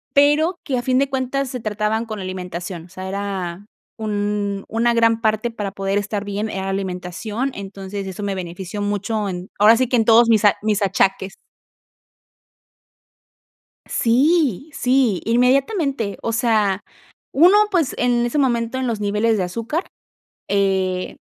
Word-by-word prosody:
pero 305 +5 +4
que 260 -4 -1
a - - -2
fin 255 +1 +2
de 275 0 +2
cuentas 265 +1 -1
se 250 - -5
trataban 215 +1 -1
con 215 -2 -6
alimentación, 180 -2 -6
o - - -20
sea 185 +1 -7
era 195 -1 -4 0.3
un 205 -2 -2
una 235 +1 +1
gran 230 -1 +3
parte 220 +1 0
para 205 -3 -4
poder 195 0 -1
estar 205 0 -3
bien, 205 +2 -3
era 190 0 -4
alimentación, 195 +6 -3
entonces 195 0 -6
eso 190 +2 -6
me 200 -1 -1
benefició 185 +3 -5
mucho, 205 +1 -1
en 180 0 -5
ahora 215 +3 +7
sí 255 0 +1
que 250 - +2
en 225 - +3
todos 230 +1 +6
mis 220 -2 +4
a 205 - +5
mis 210 -1 0
achaques. 195 0 +1 2.5
Sí, 280 - +2
sí, 250 -8 +2
inmediatamente. 260 - +1
O 230 - -1
sea, 215 -4 +1 0.5
1 350 +8 +6
pues, 335 -8 +1
en 240 -1 +2
ese 265 +5 -1
momento 240 -2 +1
en 260 - -1
los 225 -3 -2
niveles 210 +2 +1
de 195 - 0
azúcar, 230 - -3 0.6
eh, 190 -2 0
215 Hz, 150 wpm, -21 LUFS, 195-245 Hz, 2.5 s, ahora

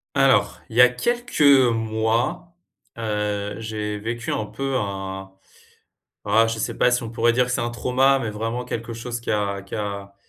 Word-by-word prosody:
Alors, - - +3
il 110 - -10
y - - +9
a 125 - +8
quelques 240 - -2 0.3
mois, 115 +10 -1 0.4
heu, 105 -2 -2
j'ai 105 -1 -4
vécu 115 +2 -4
un 110 - -1
peu, 135 +2 -3
un, 95 -3 -4 0.9
voilà, 110 +2 +4
je 115 0 -3
sais - - -2
pas 125 - +3
si 125 0 +1
on 115 - -6
pourrait 115 +1 +2
dire 125 +1 +3
que 125 - -6
c'est - - 0
un 120 - -1
trauma, 130 +3 +2
mais 115 -4 -3
vraiment 115 +4 -3
quelque 115 -1 -5
chose 120 +1 -5
qui 115 - -5
a 100 -2 -1
qui 100 - -9
a 100 -2 -5
115 Hz, 185 wpm, -23 LUFS, 105-125 Hz, 0.9 s, y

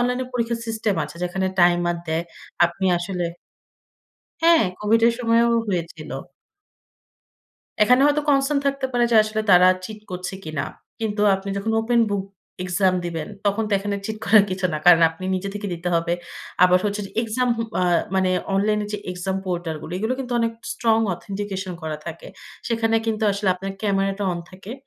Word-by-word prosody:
Online 250 +1 0
পরীক্ষার 235 -1 -1
system 220 -2 -1
আছে - - -11
যেখানে 190 +2 -1
টাইমার 175 0 +3
দেয়। 160 +1 0 0.4
আপনি 175 +3 -3
আসলে 180 0 -3 1.2
হ্যাঁ, 335 -3 +6 0.2
কোভিডের 225 +2 +4
সময়ও 235 -1 +3 0.2
হয়েছিল। 175 -4 -4 1.7
এখানে 250 +5 +5
হয়তো 295 0 +2
concern 280 0 +3
থাকতে 275 -1 0
পারে 240 -1 +3
যে, - - +2
আসলে 215 0 -2
তারা 180 0 +7 0.2
চিট 215 +2 -7
করছে 180 +1 -5
কিনা। 155 -2 -3 0.4
কিন্তু 215 -2 -2
আপনি 195 +1 -5
যখন 220 +3 -1
open 235 +1 +2
book 200 -1 -1 0.4
exam 185 +1 +2
দিবেন 165 -3 -4 0.2
তখন 200 +2 +1
তো - - -4
এখানে 200 +1 -3
চিট 220 - -4
করার 215 -2 +6
কিছু 185 0 0
না। - - 0
কারণ 175 -1 +8
আপনি 165 +3 -10
নিজে 185 +1 -3
থেকে 205 0 -4
দিতে 170 +1 -4
হবে। 170 0 +1 0.5
আবার 180 0 +5
হচ্ছে 205 0 -1
যে, - - -14
এক্সাম 245 +3 -1
হু, 230 - -1 0.2
আ - - +1 0.3
মানে 190 -1 +2 0.2
অনলাইন 210 +2 +2
এ - - -6
যে, 210 - -2
এক্সাম 190 +1 -3
পোর্টাল 175 -3 -2
গুলো, 160 - -8
এগুলো 220 +5 -1
কিন্তু 250 -2 -5
অনেক 230 0 0 0.2
strong 225 -1 +2
authentication 195 0 -5
করা 155 -1 -3
থাকে। 170 -1 -7 0.4
সেখানে 225 -1 +1
কিন্তু 220 -1 -1
আসলে 200 0 -1
আপনার 195 +1 -5
ক্যামেরাটা 195 0 0
অন 175 - -4
থাকে। 190 +5 -9
200 Hz, 170 wpm, -22 LUFS, 180-225 Hz, 1.7 s, কারণ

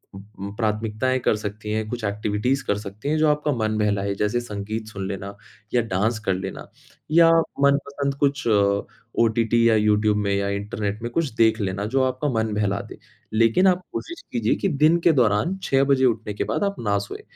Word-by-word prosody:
उम, 100 0 -9
प्राथमिकताएँ 110 +3 0
कर 110 - +1
सकती 105 0 -6
हैं, 110 0 -1
कुछ 120 -1 -5
एक्टिविटीज़ 105 +6 -1
कर 100 - 0
सकती 105 +6 -6
हैं, 155 - +1
जो 155 0 +3
आपका 150 0 +1
मन 110 -2 -1
बहलाए, 100 -2 0
जैसे 105 +4 0
संगीत 110 -1 -5
सुन 100 -3 -5
लेना 100 0 -6 0.4
या 120 - +4
डांस 110 +4 0
कर 95 - +2
लेना, 95 +1 -6 0.4
या 165 +1 +6 0.3
मनपसंद 140 0 +1
कुछ 140 -3 +1 0.7
ओटीटी 115 0 +3
या 110 - +4
यूट्यूब 105 0 +2
में 100 -1 0
या 100 0 0
इंटरनेट 100 +1 -3
में 120 - -4
कुछ 160 +2 0
देख 110 -1 +3
लेना 100 +1 -2
जो 135 -1 +3
आपका 130 +3 -1
मन 110 -3 -1
बहला 100 -1 0
दे, - - -10 0.4
लेकिन 115 - +4
आप 185 -1 +3
कोशिश 340 +1 -6
कीजिए 115 -2 +1
कि - - -1
दिन 155 +3 +4
के - - +7
दौरान 125 - +2
6 135 0 +2
बजे 135 -1 +3
उठने 110 -3 0
के - - -2
बाद - - -1
आप 200 0 0
न 100 -3 0
सोएँ। 100 - -7
110 Hz, 195 wpm, -23 LUFS, 105-130 Hz, 0.7 s, के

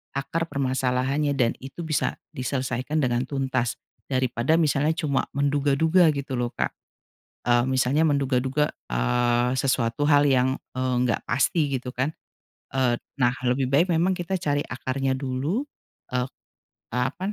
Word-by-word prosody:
akar 165 +4 -2
permasalahannya 135 +1 0
dan 120 -3 +3
itu 135 +6 -8
bisa 155 -2 0 0.2
diselesaikan 130 +3 -2
dengan 125 0 0
tuntas, 130 -4 -1 0.3
daripada 130 +2 +1
misalnya 155 -1 +2
cuma 145 -5 0
menduga-duga 145 +5 +3
gitu 140 -2 -3
loh 120 -1 0
Kak, - - 0 0.8
eee, 120 0 +4
misalnya 130 +3 +2
menduga-duga, 135 0 +1 0.2
eee, 120 - +1
sesuatu 130 +1 +1
hal 145 -1 +5
yang, 130 -1 +3 0.2
eee, 130 0 0
nggak 120 - +1
pasti 140 +3 +2
gitu 125 0 -7
kan, 130 +4 0 0.6
eee, 125 -3 +2 0.2
nah 125 0 +5 0.2
lebih 125 +1 +1
baik 155 +6 +4
memang 170 +2 +3
kita 175 +2 -2
cari 145 -3 +1
akarnya 130 +1 -2
dulu, 135 - -1 0.5
e 125 - 0
eee, - - -8 0.7
apa 130 - -1
135 Hz, 135 wpm, -25 LUFS, 125-145 Hz, 0.8 s, hal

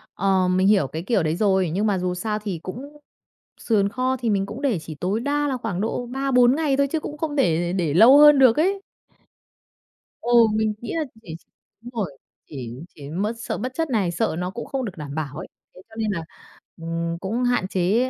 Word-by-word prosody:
Ờ, 190 -1 +2
mình 185 +1 +2
hiểu 200 -9 +4
cái 160 +5 -6
kiểu 200 -3 +1
đấy 155 +1 0
rồi. 190 -3 +2
Nhưng 205 +4 +1
mà 200 -2 +1
dù 180 0 -1
sao 210 +3 -3
thì 200 -5 -4
cũng 275 +10 -8 0.6
sườn 205 -4 +2
kho 255 +4 -1
thì 235 -2 -2
mình 195 -1 +1
cũng 225 +8 -8
để 250 - +1
chỉ 160 0 -8
tối 185 +8 -2
đa 290 +3 0
là 265 - -1
khoảng 220 -7 -4
độ 230 +3 -2
3-4 255 0 +3
ngày 300 -4 +1
thôi, 280 0 +3
chứ 320 +3 -2
cũng 295 - -7
không 305 -2 -3
để 175 - +1
để 170 -6 -1
lâu 235 - +8
hơn 295 -1 +8
được 255 -4 +6
ấy. 385 +5 +1 1.4
Ừ, 240 - -2 0.2
mình 215 0 +1
nghĩ 240 - -5
là 320 - 0 0.2
chỉ 165 -7 -8 0.5
đúng 240 - -10
rồi, 185 - -4 0.3
chỉ 130 -6 -7 0.2
chỉ 145 -1 -10
mất 200 +7 -2
sợ - - -4
mất 255 +1 -4
chất 325 +1 -2
này, 205 -8 +1
sợ 195 +1 -1
nó 180 0 -2
cũng 235 +5 -7
không 265 -2 -3
được 195 -4 -7
đảm 145 -1 -7
bảo 150 -2 -4
ấy. 180 - -7 0.3
Thế 185 - -13
cho 220 - -16
nên 220 -2 -1
là, 170 -4 -3 0.6
ừm, 165 0 -3
cũng 220 +7 -2
hạn 245 -6 +1
chế 195 +8 +1
210 Hz, 220 wpm, -23 LUFS, 180-255 Hz, 1.4 s, lâu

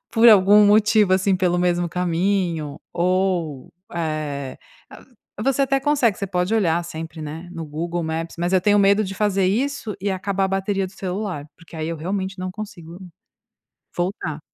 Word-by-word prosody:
por 230 +1 +6
algum 205 0 +7
motivo 210 -1 +4
assim 190 0 +3
pelo 180 -1 +1
mesmo 175 -1 +1
caminho 175 -3 -1
ou, 180 -5 0 0.2
eh, 155 -5 -3 0.9
você 270 +2 +2
até 275 0 +2
consegue, 270 -6 +2
você 200 - -3
pode 180 +2 -1
olhar 175 -6 +2
sempre, 160 -1 -7
né, 160 +4 -7
no 165 -2 -6
Google 170 +3 -3
Maps, 160 +1 -4
mas 175 +2 -1
eu 185 - +4
tenho 205 +2 +3
medo 200 +2 +4
de 195 0 -5
fazer 195 -2 +1
isso 225 +1 -1
e 200 +1 -1
acabar 195 +1 -1
a - - 0
bateria 195 0 -1
do 185 - -13
celular, 190 -5 -4
porque 165 0 -14
aí 155 0 -3
eu, 165 - -3
realmente, 190 +4 -3
não 185 0 -4
consigo 185 -5 -9 1.0
voltar. 175 -4 -3
185 Hz, 165 wpm, -22 LUFS, 165-200 Hz, 1.0 s, algum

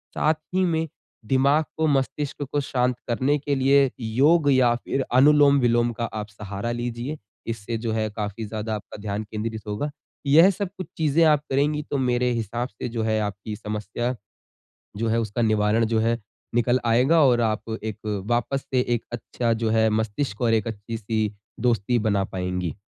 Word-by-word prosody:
साथ 155 - +3 0.2
ही 185 - +3
में 165 -2 0 0.4
दिमाग 140 +6 +3
को, 160 0 +2
मस्तिष्क 140 0 -1
को 145 - +1
शांत 125 -2 0
करने 130 +5 +2
के 140 0 -1
लिए 135 +1 +4
योग 145 +8 +3
या 130 -3 +4
फिर 135 +3 -2
अनुलोम-विलोम 130 -4 +5
का 115 +1 -3
आप 110 -2 -5
सहारा 100 +2 -5
लीजिए। 120 +4 -4 0.3
इससे 115 0 -3
जो 115 0 -3
है 110 -1 0
काफ़ी 105 +1 -4
ज़्यादा 110 +1 -3
आपका 105 - -8
ध्यान 105 +1 -3
केंद्रित 110 +1 -5
होगा। 105 +9 -2 0.4
यह 160 +7 +7
सब 200 -1 -3
कुछ 185 - -5
चीज़ें 160 +1 +3
आप 150 -2 +4
करेंगी 145 +3 +1
तो 145 - +1
मेरे 125 -1 +1
हिसाब 120 +1 -2
से 105 - -6
जो 115 -1 -2
है 110 0 +1
आपकी 105 +1 -4
समस्या 105 +3 -3 0.8
जो 115 +2 -1
है 115 +1 +2
उसका 110 +1 -2
निवारण 110 0 +2
जो 110 0 +1
है 115 +1 +1 0.4
निकल 120 +1 +3
आएगा 125 +8 +4
और 120 -2 +4
आप 110 0 -1
एक 110 -1 -4 0.3
वापस 120 +3 0
से 130 - +4 0.2
एक 115 - -5
अच्छा 120 0 -1
जो 110 - +2
है 110 0 +3
मस्तिष्क 110 +2 -2
और 115 -2 +3
एक 110 +1 +1
अच्छी-सी 110 0 -3 0.3
दोस्ती 120 0 +1
बना 100 -2 +2
पाएँगी। 90 -3 -3
120 Hz, 175 wpm, -24 LUFS, 110-135 Hz, 0.8 s, यह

